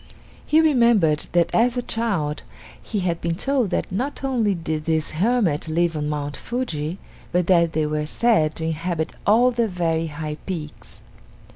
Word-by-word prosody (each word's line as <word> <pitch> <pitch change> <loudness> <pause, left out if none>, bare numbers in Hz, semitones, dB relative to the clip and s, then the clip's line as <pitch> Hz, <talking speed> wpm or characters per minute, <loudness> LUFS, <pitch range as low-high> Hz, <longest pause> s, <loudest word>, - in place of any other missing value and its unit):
He 310 +1 +5
remembered 235 - +3
that 175 -1 +2
as 240 +2 +3
a 245 - -1
child 185 -13 -1 0.4
he 210 -3 -3
had 170 -2 -1
been 170 0 -1
told 260 +1 0
that 175 - -2
not 260 +10 -3
only 235 -7 +1
did 160 -2 -3
these 160 -1 0
hermits 185 -3 +1
live 170 +1 +1
on 150 -1 -2
Mount 145 -1 -3
Fuji, 180 -10 -3 0.3
but 180 0 +1
that 170 -2 +3
they 155 -1 +1
were 150 0 -2
said 160 -6 +2
to 160 - -4
inhabit 165 0 -2
all 240 +5 +5
the 235 -1 +1
very 165 -3 -1
high 150 0 -5
peaks. 160 -6 -7
170 Hz, 165 wpm, -22 LUFS, 155-230 Hz, 0.4 s, He